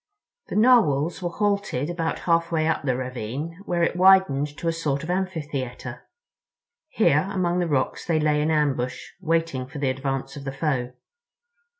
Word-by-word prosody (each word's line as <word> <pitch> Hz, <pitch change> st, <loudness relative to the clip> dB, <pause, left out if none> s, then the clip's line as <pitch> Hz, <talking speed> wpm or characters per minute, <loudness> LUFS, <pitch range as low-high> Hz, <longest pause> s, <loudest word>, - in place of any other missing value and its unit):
The -, -, -5 dB
Narwhals 190 Hz, -, +4 dB
were 175 Hz, -, -1 dB
halted 200 Hz, -8 st, -1 dB
about 165 Hz, -1 st, -2 dB
halfway 165 Hz, -2 st, +1 dB
up 160 Hz, -, +1 dB
the 130 Hz, -3 st, 0 dB
ravine, 130 Hz, -, -5 dB
where 175 Hz, -1 st, 0 dB
it 170 Hz, -, +1 dB
widened 185 Hz, -6 st, +5 dB
to 170 Hz, -, -4 dB
a 165 Hz, -, +2 dB
sort 150 Hz, -3 st, -2 dB
of 170 Hz, -, -3 dB
amphitheater. 150 Hz, -9 st, -4 dB, 0.8 s
Here, 185 Hz, -, +2 dB
among 180 Hz, -2 st, 0 dB
the 175 Hz, -, 0 dB
rocks, 140 Hz, -4 st, -1 dB
they 165 Hz, -2 st, +2 dB
lay 150 Hz, -1 st, +2 dB
in 155 Hz, -, +1 dB
ambush, 140 Hz, -5 st, 0 dB, 0.2 s
waiting 165 Hz, -6 st, 0 dB
for 150 Hz, +3 st, -9 dB
the 140 Hz, -2 st, +1 dB
advance 135 Hz, 0 st, -3 dB
of 140 Hz, -, -8 dB
the 135 Hz, -, -4 dB
foe. 135 Hz, -4 st, -1 dB
155 Hz, 165 wpm, -24 LUFS, 135-175 Hz, 0.8 s, widened